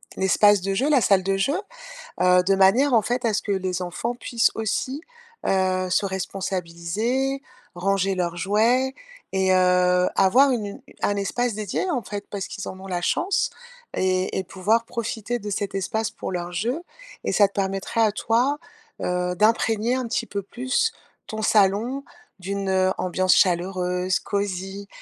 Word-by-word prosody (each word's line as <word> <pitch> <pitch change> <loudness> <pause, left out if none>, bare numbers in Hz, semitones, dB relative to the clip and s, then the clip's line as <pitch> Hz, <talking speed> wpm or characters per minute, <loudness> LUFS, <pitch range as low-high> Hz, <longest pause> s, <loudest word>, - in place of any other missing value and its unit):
l'espace 200 +1 +4
de 195 +1 -1
jeu, 265 +10 +1
la 280 -4 +4
salle 195 -3 +3
de 195 +1 +1
jeu, 235 - +1 0.7
heu, 180 0 +5
de 195 +1 +3
manière, 230 +9 +4
en 230 - +6
fait, 245 +3 -2
à 225 - +2
ce 215 - +1
que 205 - -2
les 185 -2 -1
enfants 180 +7 -3
puissent 235 -1 +1
aussi, 240 +6 -2 0.5
heu, 185 -1 +1
se 190 - +2
responsabiliser, 190 +7 -2 0.3
ranger 195 +1 0
leurs 175 -1 -1
jouets 230 +8 +2 0.4
et 190 -1 +2
heu, 180 0 +4
avoir 250 +9 +5
une 205 -4 -4 0.2
un 205 - +1
espace 235 +4 -1
dédié, 215 - -2
en 250 -7 -1
fait, 205 0 -6
parce 200 -2 -4
qu'ils - - -6
en 185 - -8
ont 195 - -9
la 180 -2 -2
chance 370 - +1 0.5
et 185 0 0
et 190 - -2
pouvoir 210 +6 +1
profiter 235 0 -3
de 210 -2 -7
cet 200 -1 -3
espace 220 +3 -1
pour - - -6
leur 175 -1 -4
jeu 240 - -2 0.4
et - - -1
ça 205 -2 +5
te 200 - -27
permettrait 195 +3 -1
à 215 -2 +3
toi, 245 +7 +1 0.4
heu, 180 0 -1
d'imprégner 225 +2 +2
un 255 -2 -2
petit 235 - -1
peu 200 -2 -4
plus 255 - -1 0.3
ton 220 0 -5
salon 215 +6 +2 0.4
d'une, 195 +1 -3
heu, 185 0 +3
ambiance 185 +1 +2
chaleureuse, 180 0 +1
cosy 200 0 -3
195 Hz, 165 wpm, -24 LUFS, 185-230 Hz, 0.7 s, en